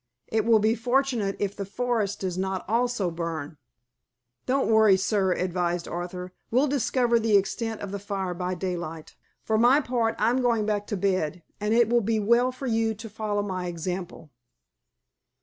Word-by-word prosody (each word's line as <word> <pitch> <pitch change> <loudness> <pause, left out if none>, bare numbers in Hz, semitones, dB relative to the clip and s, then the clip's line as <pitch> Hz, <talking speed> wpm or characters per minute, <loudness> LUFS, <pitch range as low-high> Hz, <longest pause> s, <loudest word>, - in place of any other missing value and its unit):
It 220 -1 +1
will 230 -1 +6
be 215 +1 +3
fortunate 240 -3 0
if 200 0 -2
the 200 - -4
forest 220 0 -1
does 185 -2 -2
not 190 0 -2
also 230 -4 0
burn." 165 -2 -5 0.9
"Don't 270 +1 +2
worry, 220 -3 +6
sir," 195 -1 +1
advised 175 -1 -1
Arthur. 180 +1 -5 0.2
"We'll 255 +5 +3
discover 255 -4 +2
the 220 -2 +4
extent 220 +3 -2
of 200 - -5
the 200 - -4
fire 195 -2 -3
by 180 +1 -3
daylight. 170 -4 -5 0.3
For 220 -1 +1
my 250 +5 +6
part, 240 -5 0
I'm 235 +4 +2
going 235 -4 +2
back 205 -1 -1
to 210 - -2
bed, 180 -4 -1 0.2
and 210 +2 +1
it 235 -2 +5
will 240 +1 +3
be 220 +1 0
well 235 +4 +3
for 255 +2 -8
you 225 -2 +1
to 225 +2 -9
follow 210 -1 -2
my 185 -3 -3
example." 175 -2 -5
205 Hz, 170 wpm, -26 LUFS, 185-230 Hz, 0.9 s, will